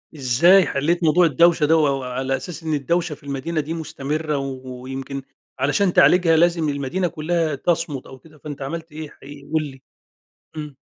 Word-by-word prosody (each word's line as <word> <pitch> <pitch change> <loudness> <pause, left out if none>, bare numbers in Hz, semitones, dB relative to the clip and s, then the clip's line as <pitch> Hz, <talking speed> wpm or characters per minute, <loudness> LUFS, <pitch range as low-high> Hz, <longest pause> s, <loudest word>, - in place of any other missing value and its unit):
إزاي 160 +8 +5
حليت 170 +5 0
موضوع 165 +3 +4
الدوشة 165 +1 +4
ده 160 +2 +4
و 150 -2 +3
وعلى 130 +1 -2
أساس 165 +6 -7
إن 160 -1 -2
الدوشة 165 +3 -1
في 150 - -22
المدينة 140 +3 -2
دي 155 +3 -5
مستمرة، 155 -1 -3
ويمكن 135 0 -6 0.4
علشان 170 +8 +2
تعالجها 175 -2 +5
لازم 170 -2 +2
المدينة 145 +6 -1
كلّها 160 -1 -1
تَصمُت 160 -2 -1
أو 130 - -12
كده 155 +1 -19
فأنتَ 145 -2 -7
عَمَلت 165 +4 -5
إيه 155 0 -7
حقيقي، 140 +1 -13
قل 160 -1 +2
لي؟ 135 -3 -10 0.7
امم. 150 -3 -7
150 Hz, 165 wpm, -22 LUFS, 135-165 Hz, 0.7 s, إزاي